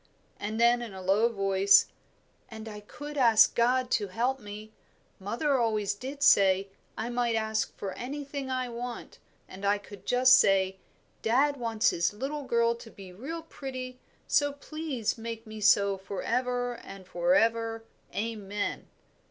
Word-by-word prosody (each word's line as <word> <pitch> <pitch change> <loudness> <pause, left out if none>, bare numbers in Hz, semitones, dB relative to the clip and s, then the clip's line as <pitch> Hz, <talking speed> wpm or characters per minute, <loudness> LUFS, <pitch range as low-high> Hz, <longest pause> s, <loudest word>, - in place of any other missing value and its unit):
And 215 +2 -4
then, 240 +1 +4
in 225 -5 -7
a 190 - -7
low 205 +5 +3
voice, 195 -2 +4 0.6
"And 220 -1 -9
I 210 -1 -7
could 290 +7 -8
ask 225 -3 +6
God 250 +1 +2
to 205 -2 +1
help 245 +7 -1
me. 210 0 -10 0.5
Mother 250 +8 0
always 215 -4 +1
did 270 +7 -6
say, 195 -3 +5 0.3
I 225 - -3
might 240 -1 0
ask 220 0 -1
for 195 - -4
anything 280 +1 -5
I 255 -1 -1
want; 240 0 -7 0.3
and 190 +1 -11
I 200 +1 +3
could 200 -1 -13
just 255 +1 +6
say, 190 -1 +2 0.4
'Dad 275 +6 +2
wants 230 -3 +1
his 170 +4 0
little 275 +6 -4
girl 235 -1 +2
to 235 0 -12
be 190 -4 -12
real 315 - -6
pretty, 255 -5 -7 0.3
so 290 -1 +2
please 285 -6 -4
make 230 0 -6
me 215 -1 -9
so 200 -1 +4
for 195 0 -6
ever 245 0 -1
and 195 -1 -11
for 175 0 +1
ever. 225 0 +1 0.3
Amen.'" 210 -2 -3
230 Hz, 155 wpm, -29 LUFS, 205-255 Hz, 0.6 s, ask